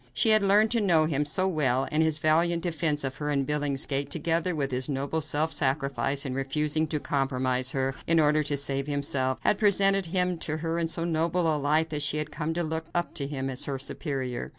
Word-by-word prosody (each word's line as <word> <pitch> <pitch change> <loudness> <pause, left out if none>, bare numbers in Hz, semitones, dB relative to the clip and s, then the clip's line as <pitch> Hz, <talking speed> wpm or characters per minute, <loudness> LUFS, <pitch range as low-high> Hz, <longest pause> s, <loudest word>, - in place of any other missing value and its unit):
She 225 - +3
had 215 -1 +7
learned 205 +2 +3
to 235 -2 +2
know 170 -6 +3
him 150 -2 -1
so 185 +6 +2
well, 135 -7 0
and 155 - +1
his 160 -1 +2
valiant 165 +2 +1
defense 160 -3 -1
of 135 0 -3
her 150 -1 -4
in 140 -2 0
Billingsgate, 140 -1 -1
together 165 +3 -1
with 140 -3 -2
his 130 +3 -2
noble 140 +3 -2
self 155 +2 +2
sacrifice 140 0 -1
in 130 - -4
refusing 150 +4 -1
to 150 0 -3
compromise 130 -2 0
her 135 0 -1
in 165 0 +3
order 150 0 +3
to 145 -1 -1
save 140 0 +1
himself, 140 -2 0
had 205 - +1
presented 195 -2 +3
him 180 0 0
to 155 -1 -2
her 165 +1 -3
in 165 - -1
so 165 +1 -2
noble 165 0 0
a - - -2
light 155 +3 +1
that 150 -1 -2
she 145 +1 +1
had 150 0 -4
come 160 +2 -4
to 175 - -1
look 160 0 -4
up 175 0 -2
to 140 -4 -2
him 135 -2 -4
as 130 -1 -1
her 140 -1 -4
superior. 130 - -4
150 Hz, 220 wpm, -26 LUFS, 140-165 Hz, -, had